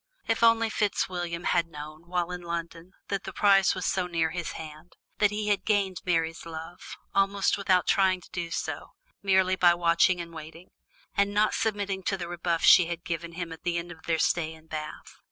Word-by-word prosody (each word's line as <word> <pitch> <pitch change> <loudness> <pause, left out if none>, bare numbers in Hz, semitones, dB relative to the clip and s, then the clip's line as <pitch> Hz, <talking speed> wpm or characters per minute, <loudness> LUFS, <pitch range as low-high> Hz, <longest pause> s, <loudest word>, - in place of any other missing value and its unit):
If 225 0 0
only 230 -1 +4
Fitzwilliam 175 -5 -1
had 170 -1 +1
known, 155 +1 -10
when 175 0 -1
in 180 0 -5
London, 170 +1 -6 0.2
that 195 -1 -2
the 195 - -6
prize 195 0 +4
lay 185 - -4
so 185 0 0
near 165 -2 0
his 175 0 -4
hand! 155 +2 -10 0.3
that 205 - +5
he 210 0 -2
had 205 - +1
gained 200 -4 0
Mary's 165 -2 0
love, 165 +1 -9 0.2
almost 195 0 +2
without 190 -2 +2
trying 190 -2 +3
to - - -17
do 170 -1 -4
so, - - -4 0.3
merely 190 -1 +3
by 175 -2 +5
watching 175 +1 +3
and 170 -1 -7
waiting, 160 +3 -11 0.4
and 200 0 +1
not 215 +1 +3
submitting 200 -3 -1
to 195 - 0
the 175 -2 -5
rebuff 170 -1 -2
she 180 -3 +8
had 170 0 -5
given 170 0 -4
him 170 -1 -5
at 160 - -9
the 175 -1 -1
end 170 0 -5
of 160 - -12
their 165 -1 +2
stay 160 0 0
in 160 0 -18
Bath! 155 -1 -7
175 Hz, 200 wpm, -27 LUFS, 165-195 Hz, 0.4 s, she